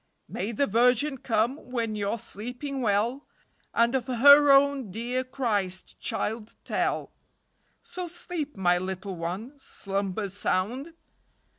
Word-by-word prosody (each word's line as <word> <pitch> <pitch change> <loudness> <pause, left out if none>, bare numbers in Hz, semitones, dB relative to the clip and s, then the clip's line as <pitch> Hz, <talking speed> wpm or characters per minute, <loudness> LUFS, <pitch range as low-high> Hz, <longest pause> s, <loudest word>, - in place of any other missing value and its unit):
May 205 - -3
the 260 +5 +1
Virgin 250 +5 +3
come 235 +2 +1
when 230 -3 -1
you're 205 +1 -1
sleeping 250 +6 -5
well, 230 +5 0 0.4
And 235 +1 +2
of 260 -1 -1
her 285 +3 +7
own 275 -4 +4
dear 240 +6 -2
Christchild 220 -2 -2
tell; - - -1 0.7
So 365 -1 -6
sleep, 335 - -5
my 175 -2 +3
little 190 +1 -5
one, 190 - -5
Slumber 195 -3 -3
sound. 230 - -2
235 Hz, 115 wpm, -27 LUFS, 200-275 Hz, 0.7 s, her